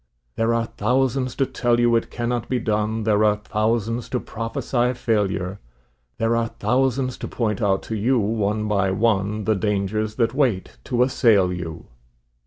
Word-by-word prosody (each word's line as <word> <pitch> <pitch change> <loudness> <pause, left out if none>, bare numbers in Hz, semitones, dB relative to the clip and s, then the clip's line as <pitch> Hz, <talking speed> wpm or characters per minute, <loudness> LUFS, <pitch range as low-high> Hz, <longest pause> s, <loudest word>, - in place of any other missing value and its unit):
There 115 +1 +1
are 115 0 0
thousands 130 +3 0
to 135 - +2
tell 120 -2 0
you 120 0 +4
it 115 - 0
cannot 120 -1 -3
be 130 - +1
done, 110 -1 -1
There 105 -1 +3
are 105 -1 +4
thousands 110 +2 -1
to 125 - -1
prophesy 120 +2 -2
failure; 100 -5 -1 0.6
There 115 +1 +1
are 115 0 +1
thousands 130 +3 0
to - - -4
point 110 -2 -2
out 95 -2 +1
to 110 - -4
you 120 +5 +2
one 105 -1 0
by 100 -2 +1
one, 105 +1 +1
The 110 - +2
dangers 105 +1 -1
that 115 0 +1
wait 120 - 0
to 125 0 +2
assail 110 -8 +3
you. 85 -3 -6
110 Hz, 165 wpm, -22 LUFS, 105-120 Hz, 0.6 s, you